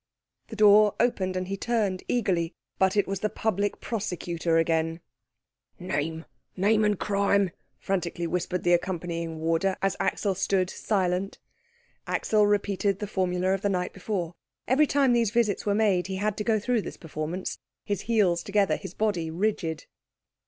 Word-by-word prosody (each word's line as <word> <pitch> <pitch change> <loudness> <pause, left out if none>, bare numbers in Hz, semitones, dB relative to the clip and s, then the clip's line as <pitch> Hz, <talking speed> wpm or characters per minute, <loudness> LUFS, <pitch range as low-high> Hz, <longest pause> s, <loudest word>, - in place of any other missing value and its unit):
The 225 - -8
door 210 0 +6
opened, 190 -6 +1
and 185 0 -3
he 195 - -2
turned 205 -4 -1
eagerly; 180 -8 0 0.2
but 190 +2 +3
it 205 - +3
was 195 -1 -2
the 215 - 0
Public 205 -2 -1
Prosecutor 175 -6 -2
again. 165 0 +1 0.8
"Name, 160 -2 -3 0.3
name, 215 +3 +3
and 210 -1 +2
crime!" 200 -2 +2 0.3
frantically 175 -3 -2
whispered 180 +1 -2
the 175 - +4
accompanying 170 -2 -2
warder, 165 +4 +1
as 195 -1 0
Axel 200 -2 0
stood 185 -1 0
silent. 190 -2 -1 0.7
Axel 210 -1 +2
repeated 200 -1 +1
the 210 - -4
formula 185 -1 0
of 195 - -1
the 205 - +1
night 180 -2 -1
before. 185 -3 -3 0.3
Every 285 +4 +4
time 275 -3 +3
these 235 -3 +3
visits 215 -3 0
were 200 - +2
made 200 -5 +2
he 190 - -3
had 205 +2 -1
to 210 - -2
go 220 -1 +2
through 235 +2 0
this - - -8
performance, 165 +2 -5 0.3
his 205 -2 -2
heels 205 -7 +2
together, 200 -1 +1
his 175 - -9
body 190 -7 0
rigid. 165 -3 -2
195 Hz, 160 wpm, -27 LUFS, 175-210 Hz, 0.8 s, door